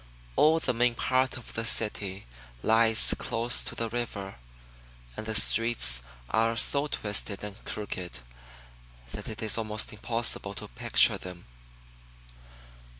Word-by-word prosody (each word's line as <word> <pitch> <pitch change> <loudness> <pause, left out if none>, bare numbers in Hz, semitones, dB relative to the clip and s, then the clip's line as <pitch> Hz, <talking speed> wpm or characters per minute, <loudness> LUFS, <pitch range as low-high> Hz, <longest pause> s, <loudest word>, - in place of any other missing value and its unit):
All 160 +2 +5
the 125 - 0
main 120 0 +2
part 130 +2 0
of 125 - -10
the 115 - -2
city 105 -3 -1 0.4
lies 110 0 +4
close 120 +2 +1
to - - -4
the 115 - -2
river, 110 - -5 0.8
and 110 - -6
the 110 - -2
streets 105 - +4 0.3
are 115 +1 +1
so 140 +4 +3
twisted 105 -5 -2
and 105 0 -8
crooked 95 -4 -4 0.9
that - - -6
it 110 0 -5
is 110 +1 -1
almost 110 -1 -3
impossible 115 +2 -1
to - - -6
picture - - +2
them. 90 -1 -9
110 Hz, 130 wpm, -28 LUFS, 105-120 Hz, 0.9 s, All